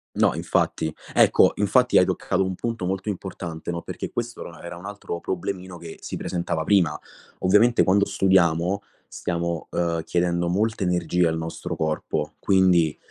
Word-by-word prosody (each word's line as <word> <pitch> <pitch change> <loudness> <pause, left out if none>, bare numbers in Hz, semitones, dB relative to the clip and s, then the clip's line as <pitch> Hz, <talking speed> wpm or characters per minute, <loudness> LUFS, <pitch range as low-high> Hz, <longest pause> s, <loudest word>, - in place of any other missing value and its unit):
No - - +3
infatti. 80 - 0 0.2
Ecco, - - +5
infatti 125 +5 +3
hai 90 - +5
toccato 95 +1 0
un 95 0 -2
punto 115 -2 -3
molto 95 +2 -3
importante, 90 -4 -6
no, 85 -1 -2
perché - - -5
questo 120 0 -4
or 85 - -9
era 85 +1 -7
un 90 - -11
altro 100 -4 -5
problemino 95 0 -4
che 85 -1 -10
si - - -5
presentava 85 -2 -2
prima. 85 -5 +2 0.4
Ovviamente 105 +6 +4
quando 100 +2 +3
studiamo, 90 0 +2 0.3
stiamo, 85 -1 -3
uhm, 85 -1 0
chiedendo 85 0 0
molta 105 +4 0
energia 90 -1 +1
al 80 - -2
nostro 80 0 -5
corpo. 80 -1 -2
Quindi, 90 -5 +3
90 Hz, 155 wpm, -24 LUFS, 85-95 Hz, 0.4 s, Ecco